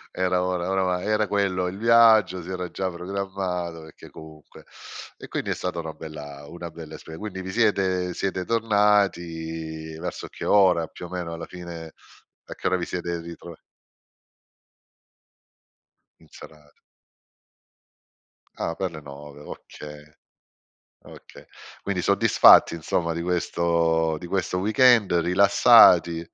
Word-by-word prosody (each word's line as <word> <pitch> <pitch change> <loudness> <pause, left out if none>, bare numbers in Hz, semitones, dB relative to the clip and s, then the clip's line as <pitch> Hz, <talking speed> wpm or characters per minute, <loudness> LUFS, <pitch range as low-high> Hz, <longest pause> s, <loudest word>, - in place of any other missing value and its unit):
Era, 90 -1 0
ora 90 -1 -2
ora 95 0 0
va 90 -1 -1
era 105 +2 0
quello 95 -3 0
il 90 +1 -4
viaggio, 110 -5 +4
si 90 - -8
era 90 -1 -5
già 95 +1 -3
programmato, 90 -2 -5
perché 80 -1 -15
comunque 80 -1 -14 0.5
e - - -11
quindi - - -4
è - - -1
stata 90 -2 -4
una 80 -1 -6
bella 75 -3 -10
una 85 0 -8
bella 80 -1 -11
esper 80 +1 -10
quindi 105 -2 -7
vi 95 - -7
siete 95 -4 0
siete 95 0 -3
tornati, 85 -8 -1
verso 90 +1 -6
che - - -9
ora 90 -5 +4
più 90 - -10
o - - -17
meno 90 -2 -5
alla 85 0 -7
fine, 85 -3 -9 0.5
a - - -8
che - - -7
ora 95 - +1
vi 90 - -4
siete 85 -1 -4
ritroa 85 0 -10 2.7
In 80 - -21
serata. 75 -2 -15 1.8
Ah 85 - -3
per 95 0 -3
le 80 - -9
9, 70 0 -12
okay, 75 0 -11 1.0
okay, - - -15 0.4
quindi 95 -3 -3
soddisfatti 100 -3 +5
insomma, 85 +1 -2
di 85 +1 -4
questo 85 -2 0
di 90 - -9
questo 90 0 -2
weekend 110 +1 +4
rilassati, 90 -1 +5
90 Hz, 135 wpm, -24 LUFS, 80-95 Hz, 2.7 s, soddisfatti